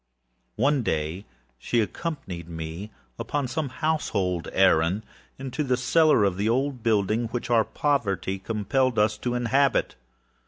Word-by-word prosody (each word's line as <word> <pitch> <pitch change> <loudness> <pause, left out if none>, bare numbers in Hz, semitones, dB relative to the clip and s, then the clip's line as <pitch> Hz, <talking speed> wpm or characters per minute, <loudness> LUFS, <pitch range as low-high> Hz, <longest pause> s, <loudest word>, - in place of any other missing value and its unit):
One 140 -1 +2
day 80 -1 -2 0.3
she 120 - 0
accompanied 105 - -4
me, 80 +5 -6 0.3
upon 145 -3 -2
some 145 +2 -2
household 105 - -1
errand, 95 +1 +3 0.3
into 135 +3 -3
the 130 -3 +1
cellar 155 -1 +4
of 95 -2 +1
the 105 +3 0
old 130 +1 0
building 110 +1 +1
which 120 +1 -4
our 115 -2 +5
poverty 100 -9 -1
compelled 115 +5 0
us 105 0 +3
to 120 +1 -2
inhabit. 130 +3 +2
115 Hz, 130 wpm, -25 LUFS, 95-135 Hz, 0.3 s, our